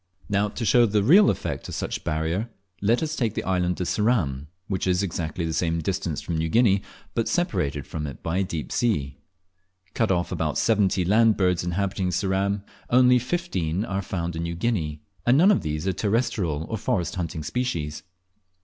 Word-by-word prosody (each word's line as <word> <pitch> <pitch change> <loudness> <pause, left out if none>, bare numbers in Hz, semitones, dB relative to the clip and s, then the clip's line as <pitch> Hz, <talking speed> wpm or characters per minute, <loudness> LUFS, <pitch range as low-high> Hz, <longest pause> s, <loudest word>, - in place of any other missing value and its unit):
Now, 105 0 +1
to 115 +3 -4
show 120 +3 +5
the 105 -1 +1
real 190 - +7
effect - - -3
of - - -5
such - - -3
barrier, 80 +9 -1 0.3
let 115 +8 +2
us 155 0 -2
take 115 -6 -1
the - - -2
island 90 -1 0
of 90 - -1
Ceram, 85 - 0 0.2
which 95 -1 -2
is 90 +1 +2
exactly 85 -2 -3
the 80 - -2
same 85 0 0
distance 80 - -2
from 85 - -3
New 80 0 -1
Guinea, 100 -2 +4 0.3
but 115 - 0
separated 75 - -1
from 75 -1 -4
it 70 - -9
by 85 +3 -1
a - - +2
deep 85 -5 -5
sea. 70 - 0 0.7
Cut 115 - +1
of 85 -2 0
about - - -1
seventy 100 -4 +2
land 110 +3 +4
birds 90 -3 +2
inhabiting 95 +1 -1
Ceram, 95 +3 0 0.3
only 125 0 +5
fifteen 115 - -2
are 100 -2 -2
found 85 -3 -3
in 80 - -3
New 85 0 -3
Guinea, 85 -8 -2 0.2
and 120 +3 +4
none 185 +7 +6
of 200 - +2
these 75 +1 -3
are 95 - +1
terrestrial 100 - 0
or 110 - -3
forest 110 -6 -1
haunting 85 -3 -4
species. 80 - -2
95 Hz, 185 wpm, -25 LUFS, 80-115 Hz, 0.7 s, real